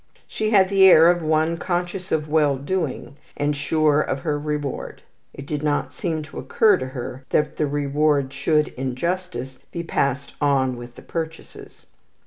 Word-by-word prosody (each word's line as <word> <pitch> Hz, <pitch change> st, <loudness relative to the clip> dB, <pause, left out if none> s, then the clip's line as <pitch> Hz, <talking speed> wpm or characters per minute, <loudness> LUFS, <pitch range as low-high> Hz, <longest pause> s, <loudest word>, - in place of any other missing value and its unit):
She 215 Hz, -, -2 dB
had 195 Hz, -4 st, +4 dB
the 195 Hz, -1 st, +4 dB
air 170 Hz, -2 st, +8 dB
of 175 Hz, -1 st, -2 dB
one 160 Hz, +1 st, +1 dB
conscious 180 Hz, +2 st, -3 dB
of 155 Hz, -1 st, 0 dB
well 150 Hz, -3 st, +2 dB
doing, 145 Hz, -2 st, -3 dB, 0.2 s
and 145 Hz, 0 st, 0 dB
sure 150 Hz, +1 st, +2 dB
of 135 Hz, -2 st, -2 dB
her 150 Hz, -1 st, -1 dB
reward. 150 Hz, -2 st, -4 dB, 0.3 s
It 140 Hz, -, -10 dB
did 150 Hz, 0 st, -3 dB
not 150 Hz, -1 st, -1 dB
seem 160 Hz, -3 st, -3 dB
to 150 Hz, -, -9 dB
occur 210 Hz, -4 st, +3 dB
to 130 Hz, -, -5 dB
her 130 Hz, 0 st, -7 dB
that 150 Hz, 0 st, 0 dB
the 150 Hz, -, +1 dB
reward 145 Hz, -1 st, +1 dB
should, 150 Hz, +2 st, +1 dB
in 130 Hz, -1 st, -4 dB
justice, 135 Hz, -5 st, -3 dB
be 170 Hz, -, -4 dB
passed 140 Hz, -4 st, -1 dB
on 135 Hz, -3 st, +2 dB
with 120 Hz, 0 st, -10 dB
the -, -, -13 dB
purchases. 165 Hz, -1 st, -7 dB
150 Hz, 170 wpm, -22 LUFS, 140-165 Hz, 0.3 s, air